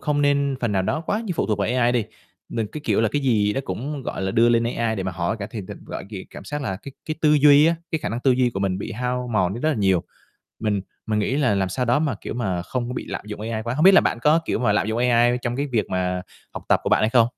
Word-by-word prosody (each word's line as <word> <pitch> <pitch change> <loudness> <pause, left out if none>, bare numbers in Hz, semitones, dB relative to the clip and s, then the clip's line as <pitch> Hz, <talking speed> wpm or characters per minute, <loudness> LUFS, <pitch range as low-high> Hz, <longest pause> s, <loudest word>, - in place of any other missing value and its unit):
không 145 -1 0
nên 140 -1 +2
phần 120 -3 0
nào 95 -1 +1
đó 150 +11 -1
quá 210 - 0
như 190 - -2
phụ - - 0
thuộc 105 -2 0
vào 100 - 0
AI 125 0 +2
đi. 120 -4 +1 0.4
Đừng, 115 -2 -2
cái 155 - -8
kiểu 105 -2 +2
là, 110 - +2
cái 145 - 0
gì 105 -6 +2
đó 135 - -1
cũng, 135 +9 -4
gọi - - -4
là, 95 - -1
đưa 115 +4 +4
lên 115 0 +3
AI 115 -2 -1
để 95 - -2
mà 95 -1 -3
hỏi 85 +5 -2
cả 100 - -4
thì 110 - -5
n 90 - -10
thật - - -7
gọi - - -6
gh 105 - -6
cảm - - -10
xác 145 0 -4
là 95 -6 -2
cái 140 - -9
cái 155 - -2
tư 150 -1 +4
duy 145 +1 +7
á, 170 - +3 0.2
cái 160 - 0
khả - - -3
năng 115 +2 -3
tư 135 - +3
duy 125 -1 +3
của 100 - -4
mình 95 -1 0
bị 110 - -5
hao 125 +1 -2
mòn 95 -2 +1
đi 120 - -6
rất 155 - +1
là 155 - +1
nhiều. 95 -5 +2 0.6
Mình 105 -3 0 0.3
mình 110 -1 0
nghĩ 125 +6 0
là 130 -8 +2
làm 95 -1 0
sao 125 +7 -1
đó 120 +4 +3
mà, 150 -4 0
kiểu - - -5
mà, 95 -8 -2
không 120 +6 -3
có 125 - -4
bị - - -4
lạm - - -5
dụng 105 0 -7
AI 110 0 -3
quá. 120 +2 -3
Hông 155 +5 +1
biết 195 0 +8
là - - +8
bạn - - 0
có, 155 +2 +4
kiểu - - -1
mà, 115 -3 +2
lạm 105 -1 +1
dụng 110 +1 -1
AI 120 0 +3
trong 120 +1 -2
cái 145 +1 -1
việc 120 -5 -1
mà 90 0 -1 0.3
học - - -6
tập - - +4
của - - -2
bạn - - +4
hay 110 - +2
không? 120 -3 +5
120 Hz, 320 wpm, -23 LUFS, 105-135 Hz, 0.6 s, biết